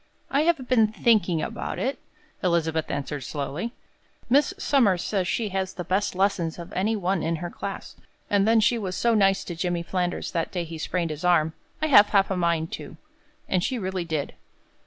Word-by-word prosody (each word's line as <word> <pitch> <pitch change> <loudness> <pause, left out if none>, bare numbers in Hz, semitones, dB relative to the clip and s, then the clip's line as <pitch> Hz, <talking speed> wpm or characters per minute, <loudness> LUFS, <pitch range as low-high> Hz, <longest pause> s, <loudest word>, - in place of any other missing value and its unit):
"I 280 - +3
have 270 -7 0
been 225 -4 +4
thinking 210 -7 +2
about 230 - -4
it," 270 +2 -2 0.4
Elizabeth 165 -3 +1
answered, 145 0 -3
slowly. 150 - -4 0.6
"Miss 285 +6 +4
Somers 230 - +2
says 190 -4 -1
she 220 +2 -1
has 190 -1 -2
the 180 - -4
best 190 +3 0
lessons 185 -4 0
of 170 0 -9
any 210 +5 +1
one 190 -3 0
in 165 +1 0
her 170 +2 -5
class, 200 -1 -6 0.3
and 200 0 +2
then 225 0 +5
she 235 +2 +3
was 185 -3 -3
so 235 -1 +2
nice 195 -3 +3
to 175 - -6
Jimmy 175 0 -1
Flanders 180 0 -2
that 165 -2 -2
day 175 -2 -2
he 165 -1 -8
sprained 170 0 -1
his 155 +2 -6
arm. 160 -3 +3 0.3
I - - +4
have 215 -9 +7
half 195 -1 +3
a - - +1
mind 170 -2 0
to." - - -7 0.5
And 185 -2 +1
she 255 - -1
really 190 -4 -2
did. 160 -4 -3
185 Hz, 195 wpm, -25 LUFS, 170-215 Hz, 0.6 s, have